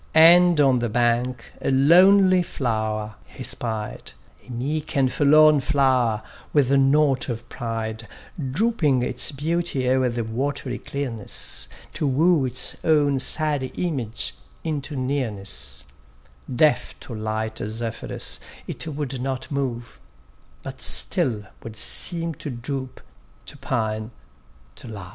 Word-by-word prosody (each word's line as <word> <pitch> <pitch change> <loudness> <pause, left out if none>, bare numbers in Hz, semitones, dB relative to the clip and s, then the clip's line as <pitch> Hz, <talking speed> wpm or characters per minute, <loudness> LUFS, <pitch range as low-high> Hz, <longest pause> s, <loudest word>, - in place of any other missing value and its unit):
And 170 +1 +7
on 135 -3 +4
the 120 -1 -1
bank 120 +2 0
a - - -1
lonely 185 +7 +6
flower 110 -8 -3
he - - -11
spied, 110 -3 -5 0.3
A - - -10
meek 145 +6 -3
and 130 -2 +3
forlorn 150 +2 +5
flower, 130 -6 +1 0.3
with 140 -3 +3
naught 140 0 +3
of 115 -1 -5
pride, 115 -2 -5 0.4
Drooping 155 - +1
its - - 0
beauty 150 -2 -1
o'er 130 0 +2
the 120 0 -2
watery 125 +3 -3
clearness, 115 - -3 0.3
To 150 - -1
woo 150 +2 +3
its 125 0 +3
own 145 -4 +3
sad 150 +1 +1
image 135 -11 -3 0.3
into 150 -2 -3
nearness: 100 - -3 0.7
Deaf 145 +4 +2
to 120 - -9
light 110 0 -3
Zephyrus 110 +1 -3 0.3
it - - -4
would 140 -4 -4
not 130 0 -4
move; 125 -4 -4 0.6
But - - -8
still 125 - +3 0.2
would 115 -1 -9
seem 165 +9 -1
to - - -4
droop, 130 +1 -5 0.4
to - - -8
pine, 110 -1 -2 0.7
to - - -10
love. 100 -4 -8
130 Hz, 120 wpm, -23 LUFS, 115-150 Hz, 0.7 s, And